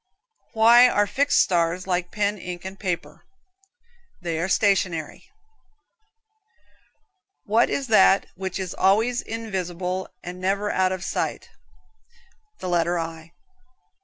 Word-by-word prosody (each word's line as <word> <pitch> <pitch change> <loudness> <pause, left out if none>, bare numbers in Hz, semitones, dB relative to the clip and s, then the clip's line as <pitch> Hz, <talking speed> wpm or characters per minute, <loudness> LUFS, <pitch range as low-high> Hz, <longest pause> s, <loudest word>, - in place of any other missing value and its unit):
Why 235 +2 +7
are 205 -3 +2
fixed 285 +7 +2
stars 175 0 0
like 180 -1 -1
pen, 205 0 -1
ink 175 0 -7
and 190 +1 -8
paper? 180 -4 -4 1.0
They 170 -3 -3
are 180 +3 -2
stationary 190 -7 0
(stationery). - - -27 2.1
What 225 +3 +2
is 280 - -2
that 195 -2 +5
which 190 0 -5
is 190 -2 -4
always 225 +6 +2
invisible 185 -4 -4
and 180 +1 -8
never 200 +2 0
out 185 0 +1
of 185 -1 -4
sight? - - -3 1.1
The - - -6
letter 175 0 +1
I. 165 0 -6
190 Hz, 120 wpm, -23 LUFS, 175-205 Hz, 2.1 s, Why